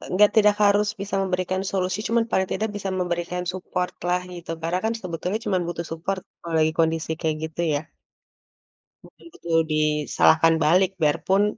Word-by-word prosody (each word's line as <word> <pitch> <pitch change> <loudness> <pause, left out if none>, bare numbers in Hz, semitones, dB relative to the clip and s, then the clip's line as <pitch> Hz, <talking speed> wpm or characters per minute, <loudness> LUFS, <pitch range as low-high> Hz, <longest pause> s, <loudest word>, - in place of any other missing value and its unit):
nggak 210 +1 +6
tidak 210 -1 +6
harus 205 +1 +4
bisa 200 0 -3
memberikan 185 0 -1
solusi 185 0 -1
cuma 230 0 +2
paling 190 0 +2
tidak 215 +3 -1
bisa 195 -1 -4
memberikan 175 0 -2
support-lah, 180 -1 -2
gitu. 175 -1 -10
Karena 170 +3 -1
kan 225 - +1
sebetulnya 180 +4 -3
cuma 200 -3 +1
butuh 170 0 -3
support 180 +4 -3 0.2
kalau 170 -1 -7
lagi 155 0 +3
kondisi 160 0 +1
kayak 160 -2 0
gitu 160 +1 -4
ya. 145 - -2 1.2
Mhm, - - -18
betul 165 -1 0
disalahkan 155 +2 +3
balik, 185 +5 +4
biarpun, 185 +6 +2
180 Hz, 155 wpm, -24 LUFS, 165-195 Hz, 1.2 s, nggak